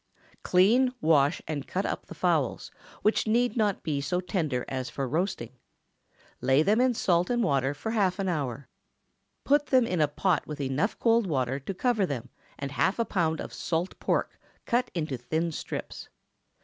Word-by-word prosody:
_) -, -, -39 dB
✠ -, -, -45 dB
Clean, 230 Hz, +8 st, +4 dB
wash, 150 Hz, -4 st, +3 dB
and 150 Hz, -3 st, -4 dB
cut 190 Hz, +2 st, -2 dB
up -, -, -3 dB
the -, -, -9 dB
fowls, -, -, 0 dB, 0.3 s
which 215 Hz, +1 st, +2 dB
need 240 Hz, +1 st, +2 dB
not 210 Hz, -4 st, 0 dB
be 145 Hz, -3 st, -1 dB
so 180 Hz, +5 st, -1 dB
tender 160 Hz, -, -2 dB
as 130 Hz, -1 st, -3 dB
for 135 Hz, -2 st, -3 dB
roasting. 160 Hz, -, -2 dB, 0.9 s
Lay 135 Hz, +3 st, +4 dB
them 215 Hz, +7 st, +3 dB
in 255 Hz, -1 st, +3 dB
salt 175 Hz, -4 st, +2 dB
and 240 Hz, -1 st, +1 dB
water 140 Hz, -, +1 dB
for 220 Hz, +10 st, -4 dB
half 195 Hz, -5 st, +1 dB
an 195 Hz, -1 st, -2 dB
hour. 140 Hz, -6 st, -2 dB, 0.8 s
Put 290 Hz, 0 st, +3 dB
them 255 Hz, -2 st, +4 dB
in 180 Hz, -7 st, 0 dB
a 150 Hz, -, +4 dB
pot 160 Hz, +3 st, 0 dB
with 150 Hz, -1 st, -6 dB
enough 140 Hz, +9 st, -1 dB
cold 230 Hz, -2 st, +3 dB
water 135 Hz, -4 st, 0 dB
to 145 Hz, +8 st, -5 dB
cover 220 Hz, -2 st, +1 dB
them, 130 Hz, -4 st, -5 dB, 0.3 s
and 140 Hz, -1 st, -5 dB
half 165 Hz, -, +1 dB
a 230 Hz, -, +1 dB
pound 160 Hz, -6 st, 0 dB
of -, -, -6 dB
salt 170 Hz, +2 st, -2 dB
pork -, -, -1 dB, 0.3 s
cut 245 Hz, +1 st, +1 dB
into 155 Hz, -6 st, -2 dB
thin 160 Hz, +8 st, -2 dB
strips. -, -, -6 dB
170 Hz, 185 wpm, -28 LUFS, 140-215 Hz, 0.9 s, Clean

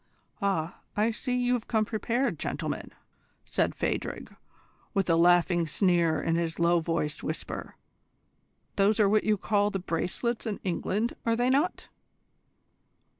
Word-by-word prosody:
"Ah, 190 Hz, -4 st, -1 dB, 0.2 s
I 215 Hz, +2 st, +3 dB
see 250 Hz, +3 st, -2 dB
that 250 Hz, -, +1 dB
you 245 Hz, -, +3 dB
have 240 Hz, -3 st, -2 dB
come 220 Hz, -2 st, +1 dB
prepared, 230 Hz, -, -1 dB
gentlemen!" -, -, -3 dB, 0.5 s
said -, -, 0 dB
Phadrig, -, -, -3 dB, 0.6 s
with 195 Hz, -1 st, +1 dB
a -, -, +5 dB
laughing 175 Hz, 0 st, +4 dB
sneer 170 Hz, -2 st, +2 dB
in 165 Hz, 0 st, 0 dB
his 165 Hz, -1 st, -2 dB
low 170 Hz, 0 st, +3 dB
voiced 160 Hz, -2 st, -2 dB
whisper. 155 Hz, -, -5 dB, 1.0 s
"Those 205 Hz, +2 st, +3 dB
are 210 Hz, -, +5 dB
what 215 Hz, +1 st, +2 dB
you 215 Hz, -1 st, +3 dB
call 205 Hz, +1 st, +1 dB
the 195 Hz, -, -2 dB
bracelets 190 Hz, +7 st, -2 dB
in 210 Hz, -, -3 dB
England, 200 Hz, +5 st, -1 dB
are 230 Hz, 0 st, +2 dB
they 245 Hz, +2 st, +2 dB
not? 295 Hz, +7 st, 0 dB
200 Hz, 145 wpm, -28 LUFS, 170-230 Hz, 1.0 s, a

